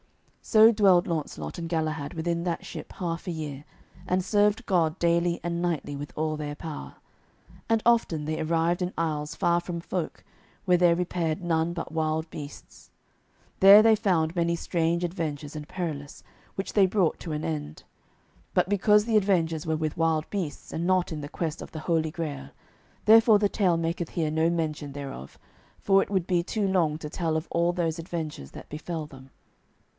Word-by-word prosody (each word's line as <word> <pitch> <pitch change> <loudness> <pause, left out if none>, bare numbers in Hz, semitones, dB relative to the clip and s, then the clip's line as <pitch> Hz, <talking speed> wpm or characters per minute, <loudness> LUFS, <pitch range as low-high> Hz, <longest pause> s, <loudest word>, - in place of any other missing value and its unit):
So 220 0 +6
dwelled 195 -5 +4
Launcelot 145 - -4
and 165 -1 -5
Galahad 155 -2 -2
within 170 +1 -1
that 175 -2 -3
ship - - -8
half 170 0 -4
a - - -1
year, 150 -4 -5 0.4
and 180 0 0
served 210 +3 +2
God 165 -5 +1
daily 170 0 +1
and 170 0 -2
nightly 165 -5 -2
with 145 +1 -7
all 155 0 -1
their 150 -1 -5
power. 150 - -7 0.7
And 225 -1 +2
often 225 -10 +2
they 155 +1 -2
arrived 165 +2 +1
in 180 0 -1
isles 150 -2 -2
far 170 0 +2
from 175 -1 -5
folk, 170 0 -4 0.4
where 180 -2 +4
there 175 -1 +4
repaired 170 -2 -1
none 165 0 0
but 170 - -5
wild 160 0 -1
beasts. 145 -1 -10 0.7
There 200 +2 +9
they 225 -1 +6
found 180 -6 +1
many 170 -1 +1
strange 170 0 0
adventures 155 -4 -4
and 150 -1 -6
perilous, 150 -6 -5 0.3
which 195 - -4
they 200 -3 +5
brought 185 -4 +1
to 165 - -5
an 150 0 -3
end. 75 -1 -4 0.7
But 180 -1 +3
because 210 +1 +3
the 225 -2 +3
adventures 165 -6 +1
were 160 0 +1
with 155 -1 -2
wild 160 -1 +1
beasts, 185 -8 -4
and 165 - -2
not 185 -2 +2
in 155 -2 -4
the 145 - -7
quest 165 0 -4
of - - -9
the 160 - -6
Holy 160 -1 0
Grail, 150 - -5 0.6
therefore 220 0 +7
the 205 0 +2
tale 185 -4 +1
maketh 165 0 -2
here 160 -3 -1
no 160 +1 +2
mention 155 -4 -2
thereof, 135 - -8 0.4
for 195 0 +4
it - - -3
would 190 -4 0
be 175 -2 +1
too 205 +2 -1
long 170 -5 +1
to 150 -1 -7
tell 160 -1 -1
of 160 - -4
all 170 +1 +2
those 170 -2 -2
adventures 160 - -5
that - - -11
befell 155 +1 -5
them. 135 -2 -14
165 Hz, 180 wpm, -27 LUFS, 155-180 Hz, 0.7 s, There